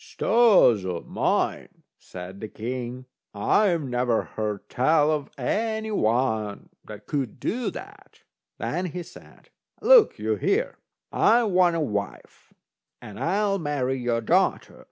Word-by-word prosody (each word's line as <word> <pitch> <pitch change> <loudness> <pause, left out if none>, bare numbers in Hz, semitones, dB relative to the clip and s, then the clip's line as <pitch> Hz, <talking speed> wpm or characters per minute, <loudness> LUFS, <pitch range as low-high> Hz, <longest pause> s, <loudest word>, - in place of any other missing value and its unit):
"Stars 200 - +4
o' 90 -2 -4
mine!" - - -2 0.2
said 90 +2 -10
the 110 - -6
king, 125 +3 -6 0.3
"I 175 - +2
never 125 -5 -1
heard 105 -2 -5
tell 150 +4 +2
of 150 -2 -2
any 220 - -2
one 110 - -1 0.2
that - - -11
could 135 -5 -3
do 240 - -2
that." - - -12 0.3
Then 180 +1 -3
he 175 +1 -6
said: - - -17 0.3
"Look - - +6
you - - -1
here, 455 +5 -1 0.3
I 235 +2 +4
want 180 -5 +3
a - - 0
wife, 105 -8 -5 0.5
and 105 - -11
I'll 195 +2 0
marry 135 -4 -2
your 120 -1 -1
daughter. 110 - 0
135 Hz, 130 wpm, -25 LUFS, -, 0.5 s, Look